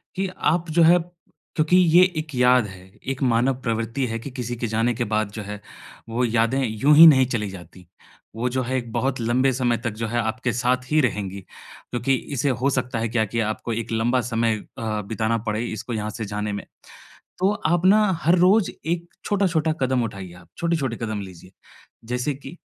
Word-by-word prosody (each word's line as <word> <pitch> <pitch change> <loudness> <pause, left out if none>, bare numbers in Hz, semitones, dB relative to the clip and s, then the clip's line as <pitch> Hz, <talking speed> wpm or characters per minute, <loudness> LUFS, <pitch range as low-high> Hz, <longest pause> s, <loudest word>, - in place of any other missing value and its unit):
कि 190 0 -1
आप 165 +2 0
जो 165 +1 +4
है 175 +2 +7
क्योंकि 170 -1 -2
ये 175 0 +6
एक 155 -3 -4
याद 125 -1 +4
है, 95 -1 -12 0.2
एक 135 0 -3
मानव 125 +2 +2
प्रवृत्ति 115 +3 -2
है 115 0 -3
कि 135 +3 -8
किसी 120 -2 -4
के 120 0 -3
जाने 115 +2 +1
के 120 - -2
बाद 110 -1 0
जो 110 - -6
है, 105 +1 -7 0.5
वो 125 +2 0
यादें 115 +3 +1
यूँ 135 +8 +3
ही 165 +1 +11
नहीं 130 -4 +6
चली 110 -5 -2
जाती। 90 -1 -12 0.5
वो 125 +2 -1
जो 130 +1 -1
है, 130 +2 -1
एक 120 -2 -5
बहुत 130 +2 -1
लंबे 125 +4 +2
समय 120 -2 +1
तक 115 0 -3
जो 115 - -1
है, 120 +2 -1
आपके 120 +2 -1
साथ 125 +2 -1
ही 155 - +4
रहेंगी, 100 -6 -2 0.5
क्योंकि 120 +2 0 0.2
इसे 140 +3 +1
हो 130 +2 +1
सकता 125 -3 -2
है 115 -1 -1
क्या 110 -1 +1
कि 115 +3 -3
आपको 110 +1 -2
एक 115 +1 -4
लंबा 120 +3 +1
समय 115 -2 0 0.2
अ, 110 -2 -2
बिताना 110 +2 -1
पड़े 110 +2 -1
इसको 115 +1 -5
यहाँ 105 -1 -2
से 110 +1 -5
जाने 105 +1 -3
में, 100 - -5 0.7
तो 190 +2 +3 0.2
आप 175 +2 +1
ना, 210 +3 +6 0.2
हर 170 +3 +5
रोज़ 190 +3 +4 0.2
एक 170 +1 -2 0.2
छोटा-छोटा 180 -6 +1
कदम 130 -1 +1
उठाइए, 100 -5 -6
आप 90 0 -16
छोटे-छोटे 160 -8 -1
कदम 110 -2 -3
लीजिए। 95 -1 -11 0.5
जैसे 125 +4 -2
कि 140 +5 -11
120 Hz, 200 wpm, -23 LUFS, 110-140 Hz, 0.7 s, ही